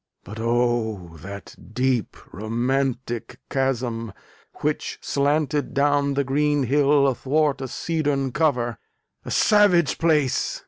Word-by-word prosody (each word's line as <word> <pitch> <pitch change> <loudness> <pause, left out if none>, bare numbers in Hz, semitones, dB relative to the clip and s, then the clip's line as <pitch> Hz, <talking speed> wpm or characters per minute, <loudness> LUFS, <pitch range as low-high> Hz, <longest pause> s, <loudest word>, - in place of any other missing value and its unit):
But 110 +2 -9
oh! 115 -7 0
that 100 +1 -9 0.2
deep 125 -5 0 0.2
romantic 120 - -2
chasm 120 -5 -1 0.5
which - - -2
slanted 145 +1 0
Down 140 0 +2
the 140 - +1
green 145 +1 +1
hill 140 +2 +3
athwart 140 +2 +1
a 130 - -3
cedarn 145 -3 -1
cover! 120 -6 0 0.5
A - - -6
savage 200 -8 +4
place! 150 -6 +1
135 Hz, 105 wpm, -23 LUFS, 120-145 Hz, 0.5 s, savage